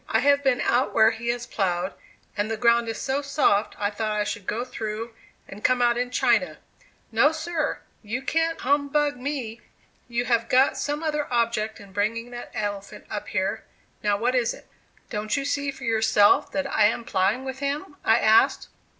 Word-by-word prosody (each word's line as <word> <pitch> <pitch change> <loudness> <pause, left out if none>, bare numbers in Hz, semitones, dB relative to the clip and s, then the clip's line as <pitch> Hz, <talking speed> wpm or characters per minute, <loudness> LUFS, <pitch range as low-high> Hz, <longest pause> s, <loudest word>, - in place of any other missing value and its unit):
I - - +2
have 285 0 +3
been 260 -3 +2
out 245 +3 +1
where 220 0 +6
he 225 +1 -7
has 240 0 -1
plowed, 185 -2 -1 0.4
and 205 +1 -1
the 225 - -2
ground 235 0 +3
is 225 - -4
so 270 +2 -1
soft 275 -7 +1
I 205 0 -1
thought 215 0 -2
I - - +2
should 205 -2 -5
go 235 +3 -2
through 225 -2 -5 0.3
and 200 +2 -11
come 255 -1 +3
out 240 -1 +3
in 245 +1 -1
China. 250 - +1 0.5
No, 235 +7 +4
sir! 320 0 -2 0.2
You 235 +5 -4
can't 325 +3 0
humbug 285 +1 +1
me. 250 -4 -4 0.5
You 240 0 -1
have 230 -1 +1
got 260 +2 +4
some 295 +2 -3
other 300 -3 -2
object 230 -2 0
in 200 -1 -13
bringing 230 +4 -1
that 240 0 -8
elephant 205 0 -4
up 205 - -4
here; 195 +3 -2 0.4
now 205 -1 +1
what 240 +4 0
is 245 -2 +1
it?" - - -16 0.5
"Don't 215 +3 -1
you 275 - -2
see 285 0 -1
for 270 0 -8
yourself 220 +2 +3
that 285 - -1
I 220 -6 +3
am 225 +2 +1
plowing 210 +5 0
with 265 0 -5
him?" 285 +3 -3
I 225 - +4
asked. 220 -1 +3
235 Hz, 190 wpm, -25 LUFS, 215-275 Hz, 0.5 s, where